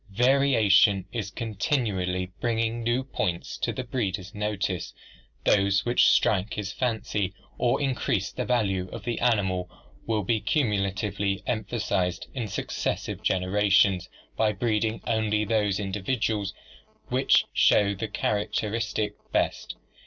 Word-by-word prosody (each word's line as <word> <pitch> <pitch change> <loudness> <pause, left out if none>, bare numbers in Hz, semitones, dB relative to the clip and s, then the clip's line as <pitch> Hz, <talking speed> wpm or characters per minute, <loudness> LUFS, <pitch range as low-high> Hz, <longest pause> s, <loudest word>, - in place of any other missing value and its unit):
Variation 120 -7 +4
is 110 -5 -3
con 115 +2 -5
tinually 95 - -1
bringing 115 0 0
new 120 +3 0
points 100 -9 -3
to - - 0
the 130 - -4
breeder's 100 -6 -3
notice; 105 -4 -2 0.5
those 100 -1 +3
which 120 0 +4
strike 105 +1 +2
his 105 -1 -4
fancy 105 -5 -1 0.2
or 120 - +2
increase 125 -8 0
the 125 - -3
value 100 -7 0
of 115 - -7
the 120 -1 -2
animal 95 -7 +1 0.4
will 110 -2 0
be 110 +2 0
cumu 115 -10 +1
latively 100 0 -2
emphasized 105 -5 -1
in 120 -5 -3
successive - - -3
generations 95 -1 +2 0.3
by 110 -1 +2
breeding 110 +1 0
only 110 -2 +1
from - - -11
those 105 -3 +1
individuals 105 +1 -1 0.5
which - - +4
show 100 -1 +4
the 100 +3 -4
characteristic 105 +1 -1 0.2
best. - - -1
105 Hz, 125 wpm, -26 LUFS, 95-115 Hz, 0.5 s, Variation